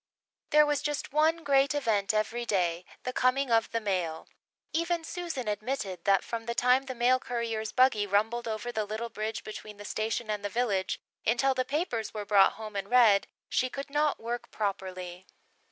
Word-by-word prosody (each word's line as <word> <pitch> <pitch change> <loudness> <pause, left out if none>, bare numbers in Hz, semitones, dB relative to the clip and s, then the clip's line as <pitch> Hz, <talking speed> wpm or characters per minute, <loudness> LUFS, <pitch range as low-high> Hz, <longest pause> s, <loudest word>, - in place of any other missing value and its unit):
There 300 0 +6
was 295 -1 0
just 295 -2 -3
one 320 +2 +3
great 280 0 +3
event 220 -8 +1
every 215 +3 -1
day 180 -5 0 0.2
the 255 - -3
coming 255 +1 +2
of 225 -1 +3
the 230 - -1
mail. 180 -7 -2 0.5
Even 335 0 0
Susan 325 -8 -4
admitted 210 -2 -3
that 195 -2 +4
from 230 -1 -5
the 235 - -2
time 250 +2 +3
the 260 -1 -5
mail 245 +2 +3
courier's 230 -3 -3
buggy 255 -5 +3
rumbled 220 +4 +1
over 220 +2 -3
the 220 -3 -1
little 220 +3 -4
bridge 215 0 -4
between 215 -1 -8
the 205 - -10
station 220 +2 -2
and 210 -1 -3
the 205 - -2
village 205 -5 0 0.2
until 265 +4 +2
the 255 -1 -1
papers 260 - -2
were 210 -1 -4
brought 200 -1 +5
home 215 -1 -8
and 195 0 -3
read, 230 -5 +5 0.2
she 255 - +1
could 275 +2 -6
not 295 0 +1
work 235 +1 -4
properly. 185 -3 -4
230 Hz, 185 wpm, -29 LUFS, 205-260 Hz, 0.5 s, There